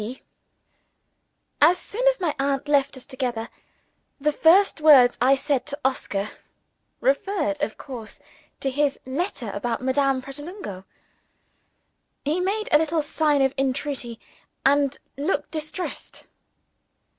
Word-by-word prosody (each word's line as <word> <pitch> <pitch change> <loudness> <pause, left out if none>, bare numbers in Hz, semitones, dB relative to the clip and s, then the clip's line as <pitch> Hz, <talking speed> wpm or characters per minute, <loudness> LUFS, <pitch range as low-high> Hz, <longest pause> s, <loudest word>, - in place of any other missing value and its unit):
P.] 240 +5 -7 1.4
As 335 +5 +6
soon 485 +7 -2
as - - +4
my 340 -5 0
aunt 275 +1 0
left 280 -2 +2
us 255 - -9
together, 245 -3 -3 0.7
the 300 +2 +2
first 330 +3 +4
words 270 -6 +7
I 265 +2 +5
said 275 -1 -1
to 285 0 -3
Oscar, 210 -6 -1 0.7
referred 300 -1 0
(of 220 - -2
course) 235 -6 -9 0.4
to 270 - 0
his 285 +1 0
letter 260 - -2
about 230 +4 -2
Madame 265 0 +1
Pratolungo. 275 - -8 1.4
He 305 +5 +1
made 405 +4 -1
a 300 - +6
little 320 0 0
sign 295 -2 +2
of 265 0 +2
entreaty, 265 -3 -2 0.5
and 280 0 +3 0.2
looked 295 +7 -1
distressed. 310 +3 -6
280 Hz, 120 wpm, -24 LUFS, 260-310 Hz, 1.4 s, words